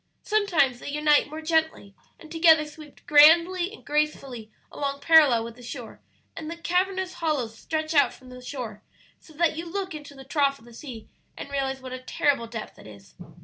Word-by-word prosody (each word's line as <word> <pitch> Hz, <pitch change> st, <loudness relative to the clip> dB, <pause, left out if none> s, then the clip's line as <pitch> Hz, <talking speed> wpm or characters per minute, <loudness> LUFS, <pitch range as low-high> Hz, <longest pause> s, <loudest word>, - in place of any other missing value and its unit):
Sometimes 345 Hz, -, +1 dB
they -, -, -7 dB
unite 300 Hz, 0 st, +2 dB
more 310 Hz, +1 st, -8 dB
gently, 320 Hz, -10 st, -1 dB, 0.3 s
and 315 Hz, -, -14 dB
together 320 Hz, -2 st, +5 dB
sweep 300 Hz, -1 st, -14 dB
grandly 335 Hz, +5 st, +5 dB
and 440 Hz, -, -14 dB
gracefully 275 Hz, -6 st, -2 dB, 0.2 s
along 280 Hz, -1 st, -3 dB
parallel 285 Hz, -6 st, +5 dB
with 230 Hz, 0 st, -8 dB
the 245 Hz, -, -15 dB
shore; 240 Hz, -1 st, -9 dB, 0.3 s
and 320 Hz, -1 st, -7 dB
the 335 Hz, -, -6 dB
cavernous 370 Hz, +2 st, -1 dB
hollows 300 Hz, -10 st, -2 dB
stretch 315 Hz, +4 st, -3 dB
out 285 Hz, -, +4 dB
from 255 Hz, -1 st, -16 dB
the 250 Hz, 0 st, -11 dB
shore 245 Hz, -5 st, -7 dB, 0.4 s
so -, -, -19 dB
that 325 Hz, 0 st, +1 dB
you 335 Hz, +2 st, -6 dB
look 380 Hz, -1 st, -4 dB
into 295 Hz, -2 st, -10 dB
the 270 Hz, -, -11 dB
trough 275 Hz, 0 st, +1 dB
of 230 Hz, -, -20 dB
the 240 Hz, -, -15 dB
sea 235 Hz, -3 st, -10 dB, 0.3 s
and 280 Hz, -, -8 dB
realize 270 Hz, -1 st, -2 dB
what 255 Hz, -1 st, -8 dB
a 255 Hz, -, -5 dB
terrible 255 Hz, -1 st, 0 dB
depth 225 Hz, -1 st, -8 dB
it -, -, -13 dB
is. 100 Hz, -2 st, -15 dB
295 Hz, 190 wpm, -25 LUFS, 255-325 Hz, 0.4 s, together